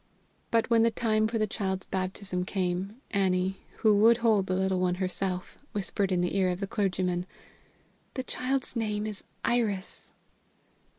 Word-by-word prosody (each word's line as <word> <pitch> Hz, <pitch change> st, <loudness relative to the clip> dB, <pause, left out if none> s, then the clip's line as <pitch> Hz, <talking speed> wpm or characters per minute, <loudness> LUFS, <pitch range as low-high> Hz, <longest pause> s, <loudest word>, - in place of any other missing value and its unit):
But 230 Hz, -1 st, +2 dB
when 230 Hz, -1 st, +6 dB
the 230 Hz, -, +5 dB
time 220 Hz, -1 st, +1 dB
for 225 Hz, +1 st, -1 dB
the 215 Hz, -, +2 dB
child's 190 Hz, -3 st, -2 dB
baptism 185 Hz, 0 st, -2 dB
came, 185 Hz, +2 st, -2 dB, 0.2 s
Annie, 190 Hz, -1 st, +1 dB, 0.3 s
who 215 Hz, -2 st, +6 dB
would 225 Hz, +3 st, +6 dB
hold 220 Hz, -5 st, +3 dB
the 185 Hz, -, 0 dB
little 190 Hz, 0 st, +1 dB
one 180 Hz, -1 st, +2 dB
herself, 185 Hz, 0 st, -2 dB
whispered 195 Hz, -1 st, -1 dB
in 180 Hz, -1 st, +2 dB
the 180 Hz, +1 st, -1 dB
ear 190 Hz, -2 st, +3 dB
of 180 Hz, 0 st, -2 dB
the 200 Hz, -, -1 dB
clergyman: 180 Hz, -3 st, -1 dB, 0.9 s
"The 260 Hz, -, -2 dB
child's 255 Hz, +1 st, -2 dB
name 210 Hz, -2 st, -1 dB
is 215 Hz, -2 st, -5 dB, 0.2 s
Iris." 215 Hz, -5 st, -1 dB
195 Hz, 160 wpm, -29 LUFS, 185-220 Hz, 0.9 s, when